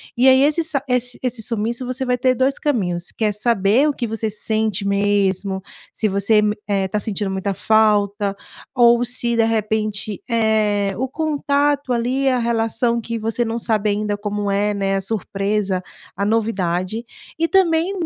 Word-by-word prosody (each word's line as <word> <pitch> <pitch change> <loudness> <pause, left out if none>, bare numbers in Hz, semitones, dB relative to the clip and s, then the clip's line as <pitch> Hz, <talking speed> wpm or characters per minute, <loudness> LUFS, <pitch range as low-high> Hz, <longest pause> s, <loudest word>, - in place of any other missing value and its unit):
E 250 +2 +4
aí, 260 0 +6
esse 305 +3 +2
sa 285 -4 -1
esse 250 -1 -1
esse 245 -2 -2
sumiço 235 +3 -2
você 260 +1 -2
vai 250 -1 0
ter 255 0 +2
2 265 +2 +1
caminhos, 180 - -1
que 220 - -2
é 210 - +2
saber 220 +5 +2
o 290 - 0
que 245 - -3
você 225 0 -2
sente 215 -1 -2
mesmo, 200 -1 +1 0.3
se 215 - 0
você 200 +2 +1
m 210 0 +2
eh, 195 -2 0
tá 210 +2 -2
sentindo 205 -2 -3
muita 190 0 -2
falta 205 -2 +2 0.4
ou 240 -1 +5
se 240 -1 -1
de 230 - +3
repente, 215 -1 -1
eh, 215 -3 +1
o 260 +2 -2
contato 285 -3 0
ali, 255 +3 +1
a 255 - +2
relação 235 0 0
que 230 +1 -4
você 225 +2 -1
não 230 0 -2
sabe 215 -2 0
ainda 205 0 -1
como 205 -1 -2
é, 205 +1 +1
né, 195 -1 0
a - - -2
surpresa, 195 -1 -2 0.3
a 200 - -2
novidade, 205 -2 -1 0.4
e 330 - +2
também 350 -2 +2
220 Hz, 175 wpm, -20 LUFS, 205-245 Hz, 0.4 s, aí